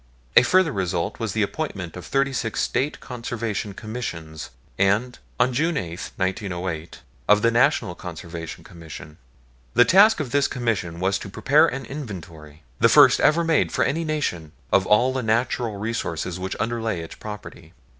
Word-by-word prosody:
A -, -, +10 dB
further 180 Hz, +5 st, +3 dB
result 90 Hz, -5 st, -2 dB
was 110 Hz, -4 st, -2 dB
the 110 Hz, -, +1 dB
appointment 100 Hz, -, -4 dB
of 90 Hz, -, -8 dB
thirty 135 Hz, 0 st, +1 dB
six 115 Hz, -3 st, -2 dB
State 135 Hz, +4 st, -1 dB
Conservation 115 Hz, -4 st, -4 dB
Commissions 85 Hz, -, -6 dB, 0.3 s
and, 100 Hz, +6 st, +1 dB, 0.2 s
on 125 Hz, -, +3 dB
June 160 Hz, +5 st, +1 dB
8, 85 Hz, -1 st, -5 dB
1908, 95 Hz, -4 st, -3 dB, 0.3 s
of 105 Hz, +1 st, +5 dB
the 115 Hz, -, +4 dB
National 120 Hz, -, +2 dB
Conservation 85 Hz, -2 st, -8 dB
Commission. 80 Hz, -2 st, -11 dB, 0.6 s
The 120 Hz, -, +7 dB
task 205 Hz, -, +6 dB
of 140 Hz, -6 st, -3 dB
this 140 Hz, +1 st, +3 dB
Commission 110 Hz, -9 st, -2 dB
was 95 Hz, +2 st, +1 dB
to -, -, -8 dB
prepare 145 Hz, +10 st, +4 dB
an 135 Hz, -3 st, -4 dB
inventory, 85 Hz, -, -9 dB, 0.2 s
the -, -, +5 dB
first -, -, +7 dB
ever 165 Hz, +3 st, +4 dB
made 165 Hz, -2 st, +2 dB
for -, -, +1 dB
any 155 Hz, +5 st, 0 dB
nation, 145 Hz, -, -3 dB, 0.2 s
of 95 Hz, -, +4 dB
all 120 Hz, +5 st, +4 dB
the 130 Hz, -, -1 dB
natural 120 Hz, 0 st, 0 dB
resources 90 Hz, -5 st, -3 dB
which 95 Hz, +1 st, -4 dB
underlay 115 Hz, -5 st, -2 dB
its 80 Hz, -, -8 dB
property. 105 Hz, -1 st, -10 dB
110 Hz, 160 wpm, -23 LUFS, 90-130 Hz, 0.6 s, A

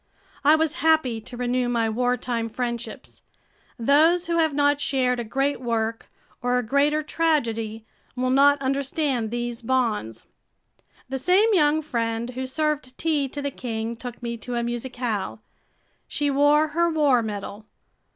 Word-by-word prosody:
I 300 Hz, +2 st, +6 dB
was 315 Hz, -1 st, +1 dB
happy 310 Hz, -8 st, +2 dB
to 240 Hz, +3 st, -9 dB
renew 245 Hz, 0 st, 0 dB
my 230 Hz, -2 st, +1 dB
wartime 245 Hz, 0 st, -1 dB
friendships. 235 Hz, +1 st, -5 dB, 0.6 s
Those 315 Hz, +8 st, +4 dB
who 335 Hz, 0 st, 0 dB
have 320 Hz, -1 st, +3 dB
not 290 Hz, 0 st, +2 dB
shared 260 Hz, -3 st, +1 dB
a -, -, -2 dB
great 270 Hz, +5 st, -1 dB
work 230 Hz, -2 st, -2 dB, 0.3 s
or 245 Hz, +1 st, +1 dB
a 250 Hz, -, 0 dB
greater 285 Hz, +5 st, +2 dB
tragedy 230 Hz, -9 st, -1 dB, 0.3 s
will 255 Hz, 0 st, 0 dB
not 285 Hz, +2 st, +5 dB
understand 270 Hz, -3 st, -1 dB
these 240 Hz, +1 st, -4 dB
bonds. 230 Hz, -, -1 dB, 0.8 s
The 265 Hz, +1 st, -3 dB
same 385 Hz, -, +4 dB
young 310 Hz, -3 st, +3 dB
friend 230 Hz, -3 st, -2 dB
who 260 Hz, +1 st, -4 dB
served 295 Hz, -2 st, -2 dB
tea 305 Hz, -4 st, 0 dB
to 285 Hz, +2 st, -6 dB
the 280 Hz, -, -2 dB
king 230 Hz, -2 st, -4 dB
took 245 Hz, +1 st, -9 dB
me 235 Hz, 0 st, -3 dB
to 245 Hz, +2 st, -5 dB
a 235 Hz, -, 0 dB
musicale. 240 Hz, -3 st, -3 dB, 0.7 s
She 290 Hz, -1 st, -1 dB
wore 290 Hz, +2 st, +4 dB
her 340 Hz, +3 st, +1 dB
war 290 Hz, -6 st, +3 dB
medal. 210 Hz, 0 st, -6 dB
255 Hz, 150 wpm, -24 LUFS, 235-290 Hz, 0.8 s, I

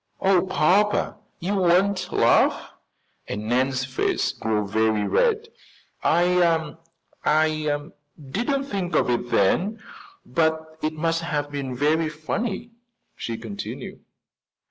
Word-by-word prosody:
"Oh, 190 Hz, -1 st, +3 dB
papa, 190 Hz, +4 st, +2 dB, 0.2 s
you 185 Hz, +3 st, -2 dB
won't 185 Hz, +1 st, +2 dB
laugh?" -, -, +3 dB, 0.6 s
and 105 Hz, +1 st, -4 dB
Nan's 130 Hz, +2 st, +1 dB
face 130 Hz, 0 st, 0 dB
grew 105 Hz, -2 st, -1 dB
very 110 Hz, 0 st, +1 dB
red. 450 Hz, -2 st, +1 dB, 0.5 s
"I 170 Hz, -2 st, +2 dB, 0.5 s
I 155 Hz, -1 st, +2 dB, 0.4 s
didn't 235 Hz, -, -1 dB
think 190 Hz, -, -3 dB
of 125 Hz, -, +3 dB
it 120 Hz, 0 st, -1 dB
then, 185 Hz, -, +2 dB, 0.5 s
but 160 Hz, -1 st, -1 dB
it 155 Hz, +1 st, -1 dB
must 165 Hz, +1 st, 0 dB
have 145 Hz, -4 st, -2 dB
been 135 Hz, -3 st, -4 dB
very 155 Hz, +4 st, +2 dB
funny," 195 Hz, +9 st, -4 dB, 0.4 s
she 115 Hz, -1 st, -4 dB
continued. 110 Hz, -3 st, -7 dB
160 Hz, 110 wpm, -24 LUFS, 130-185 Hz, 0.6 s, Oh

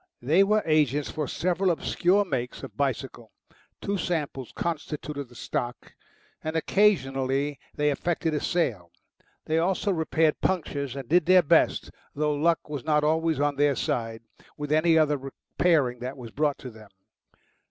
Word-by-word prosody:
They 160 Hz, +10 st, +4 dB
were 210 Hz, +2 st, +2 dB
agents 150 Hz, -3 st, +2 dB
for 155 Hz, -3 st, -3 dB
several 180 Hz, +5 st, 0 dB
obscure 180 Hz, +3 st, +2 dB
makes 130 Hz, -8 st, -4 dB
of 120 Hz, -7 st, -9 dB
bicycle, 130 Hz, -3 st, -3 dB, 0.5 s
two 200 Hz, -1 st, -1 dB
samples 150 Hz, -7 st, -3 dB
constituted 150 Hz, -3 st, -4 dB
the 120 Hz, -, -17 dB
stock, 120 Hz, +1 st, -4 dB, 0.5 s
and 155 Hz, +1 st, -3 dB
occasionally 140 Hz, -7 st, +1 dB, 0.2 s
they 150 Hz, 0 st, +2 dB
effected 165 Hz, +2 st, -1 dB
a 150 Hz, -, 0 dB
sale; 110 Hz, -, -1 dB, 0.6 s
they 160 Hz, +1 st, +1 dB
also 190 Hz, +4 st, +1 dB
repaired 160 Hz, -2 st, +1 dB
punctures 140 Hz, -7 st, -1 dB
and 135 Hz, -3 st, -6 dB
did 175 Hz, +2 st, +3 dB
their 185 Hz, -1 st, +6 dB
best 145 Hz, -, +2 dB, 0.2 s
though 150 Hz, +1 st, +1 dB
luck 165 Hz, +3 st, +1 dB
was 145 Hz, -4 st, -5 dB
not 150 Hz, -1 st, +2 dB
always 160 Hz, 0 st, +1 dB
on 145 Hz, -1 st, +1 dB
their 145 Hz, -1 st, +3 dB
side 115 Hz, -2 st, -2 dB, 0.3 s
with 150 Hz, 0 st, -5 dB
any 160 Hz, +1 st, +4 dB
other 150 Hz, -2 st, +3 dB
repairing 135 Hz, -1 st, 0 dB
that 130 Hz, +3 st, -6 dB
was 120 Hz, -3 st, -9 dB
brought 145 Hz, +1 st, 0 dB
to 130 Hz, -, -9 dB
them. 110 Hz, -2 st, -15 dB
150 Hz, 155 wpm, -26 LUFS, 135-165 Hz, 0.6 s, their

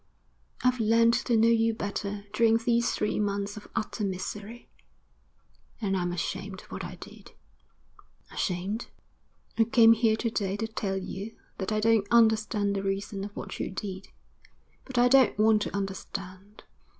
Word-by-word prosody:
I've 250 Hz, 0 st, +2 dB
learnt 230 Hz, +1 st, +4 dB
to 235 Hz, -2 st, +2 dB
know 225 Hz, +1 st, +5 dB
you 225 Hz, -1 st, +3 dB
better 200 Hz, 0 st, -4 dB
during 225 Hz, 0 st, +4 dB
these 235 Hz, +1 st, +1 dB
three 210 Hz, -, -1 dB
months 200 Hz, -1 st, -1 dB
of 210 Hz, -, -10 dB
utter 215 Hz, 0 st, -2 dB
misery, 205 Hz, +4 st, -5 dB, 1.1 s
and 200 Hz, -4 st, -1 dB
I'm 175 Hz, -1 st, -1 dB
ashamed 190 Hz, +2 st, -4 dB
of -, -, -20 dB
what -, -, -5 dB
I -, -, -6 dB
did.' -, -, -13 dB, 1.0 s
'Ashamed?' 190 Hz, +4 st, -2 dB, 0.7 s
'I 225 Hz, -, +6 dB
came 230 Hz, 0 st, +6 dB
here 225 Hz, -1 st, +2 dB
to 230 Hz, +1 st, -2 dB
day 200 Hz, -2 st, -1 dB
to 225 Hz, -, -2 dB
tell 200 Hz, -3 st, -3 dB
you 195 Hz, +3 st, -6 dB, 0.2 s
that 190 Hz, +1 st, -2 dB
I 215 Hz, -, +1 dB
don't 220 Hz, -2 st, +3 dB
understand 220 Hz, -3 st, +3 dB
the 195 Hz, -, -1 dB
reason 195 Hz, 0 st, -3 dB
of 205 Hz, 0 st, -7 dB
what -, -, -7 dB
you -, -, -2 dB
did; 190 Hz, 0 st, -6 dB, 0.8 s
but 260 Hz, -2 st, -7 dB
I 245 Hz, +1 st, +6 dB
don't 260 Hz, -4 st, +5 dB
want 215 Hz, 0 st, +4 dB
to -, -, -3 dB
understand. 195 Hz, 0 st, -6 dB
210 Hz, 160 wpm, -28 LUFS, 195-225 Hz, 1.1 s, I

